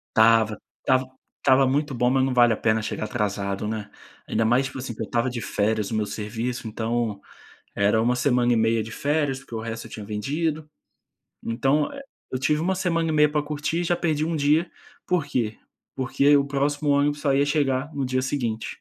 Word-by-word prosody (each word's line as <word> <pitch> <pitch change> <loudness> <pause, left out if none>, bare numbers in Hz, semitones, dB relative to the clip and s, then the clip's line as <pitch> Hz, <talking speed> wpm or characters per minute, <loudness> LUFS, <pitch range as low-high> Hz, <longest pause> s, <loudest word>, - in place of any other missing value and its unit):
Estava. 110 -1 +4 0.3
Estava 130 -1 +2 0.4
estava 130 +1 +5
muito 145 +2 0
bom, 125 0 +1
mas 130 +1 +3
não 135 - 0
vale 120 -2 +5
a 110 - 0
pena 110 0 +1
chegar 110 - -4
atrasado, 100 -2 -2
né. 110 -1 -4 0.4
Ainda 115 - +1
mais, 120 +4 +3
tipo 135 0 -7
assim, 125 -2 -5
que 110 - -5
eu 110 - -3
estava 120 +2 0
de 120 -1 -4
férias 105 0 0
do - - -4
meu 105 -1 0
serviço, 115 +3 -4
então 110 -1 -2 0.6
era 100 +2 +3
1 120 +2 +2
semana 125 -1 +2
e - - +2
meia 115 0 +2
de 110 - -9
férias 145 0 0
porque 125 -3 -10
o 110 - -2
resto 115 0 -5
eu - - -19
tinha 105 - -7
vendido. 150 +9 -2 0.7
Então, 135 +6 +1
eh, 275 - -8 0.3
eu 130 - -1
tive 150 +3 +1
1 190 +3 0
semana 165 -3 0
e - - +1
meia 150 -1 +4
para 150 - +1
curtir 150 +3 -2
e - - 0
já 175 +1 +2
perdi 155 -3 0
1 165 0 -1
dia, 155 +3 +2 0.4
por 180 -5 +1
quê? 120 -6 -2 0.4
Porque 140 +2 +3
o 140 -1 +3
próximo 145 +1 -1
ônibus 145 +1 +2
só 140 -2 +2
ia 140 +1 +3
chegar 145 -2 0
no 140 - -1
dia 130 0 0
seguinte. 120 -5 -2
130 Hz, 210 wpm, -24 LUFS, 110-145 Hz, 0.7 s, estava